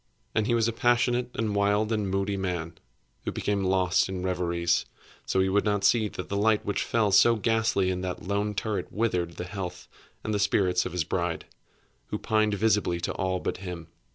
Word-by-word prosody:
And 110 -1 +1
he 120 - +2
was 115 -1 +2
a 115 - -1
passionate, 120 +1 +2
and 110 -2 -1
wild, 105 +2 +2
and 105 -3 0
moody 100 +1 0
man, 90 -3 -3 0.5
who - - -2
became 100 -1 -1
lost 95 0 +2
in 95 -1 -4
reveries; 85 -2 0 0.4
so - - 0
that 95 - +5
he 95 - +1
would 100 +2 +2
not 105 -2 0
see 110 +1 +4
that 90 - -7
the 100 - -3
light 105 +1 +2
which 100 - -1
fell 110 -3 +1
so 115 +4 +6
ghastly 110 -4 +1
in 90 0 -3
that 90 -1 -4
lone 100 +3 -1
turret 105 -3 -2
withered 90 -6 -1
the - - -5
health 90 0 -6 0.4
and 110 - -2
the 105 - 0
spirits 95 -2 +2
of - - -8
his 90 -1 0
bride, 85 +1 -2 0.6
who - - -3
pined 110 -1 +1
visibly 105 -5 +1
to 85 - -2
all 95 -1 -1
but - - -3
him. 90 -3 -7
100 Hz, 205 wpm, -27 LUFS, 90-110 Hz, 0.6 s, so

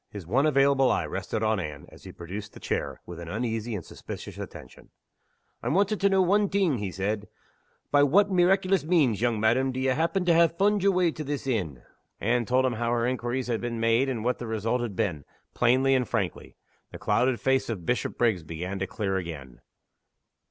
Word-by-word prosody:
His 100 -4 -8
one 130 - +2
available 140 -2 +4
eye - - +1
rested 110 - -3
on 110 -1 +1
Anne, 75 -5 -6
as - - -16
he - - -8
produced 95 +5 -8
the - - -12
chair, - - -3
with 85 -1 -9
an 85 - -8
uneasy 115 +3 -3
and 90 - -6
suspicious - - -9
attention. 65 - -10 0.7
"I'm - - -1
wanting 205 +2 +2
to 200 - +3
know 190 -1 +4
one 200 +2 +2
thing," 185 - +1
he 100 -2 -3
said. 100 +3 -3 0.6
"By 145 - +5
what 195 +9 +4
meeraiculous 185 0 +3
means, 150 - +2
young 120 -3 +1
madam, 120 +5 +2
do 130 - -4
ye 130 0 +1
happen 165 +7 0
to 175 - +4
ha' 170 0 +5
fund 205 +1 +3
yer 200 - +4
way 180 -3 +2
to 155 - -6
this 145 -1 -4
inn?" 90 - -2 0.4
Anne 120 +2 +1
told 130 +1 +3
him 130 - +1
how 115 +1 -2
her 120 -1 +1
inquiries 125 0 -2
had 115 -2 -2
been 120 -1 -3
made 115 +4 +2
and 115 -4 -3
what 125 +1 0
the 120 - -5
result 110 +3 -1
had 115 -5 -4
been, 80 -7 -1 0.3
plainly 130 +3 +3
and 130 -2 +1
frankly. 100 -7 -3 0.4
The - - -8
clouded 125 0 +1
face 135 -1 +1
of 95 -7 -4
Bishopriggs 120 -3 0
began 85 +5 -5
to 95 - -2
clear 95 -3 -2
again. 75 -9 -7
120 Hz, 205 wpm, -27 LUFS, 105-145 Hz, 0.7 s, By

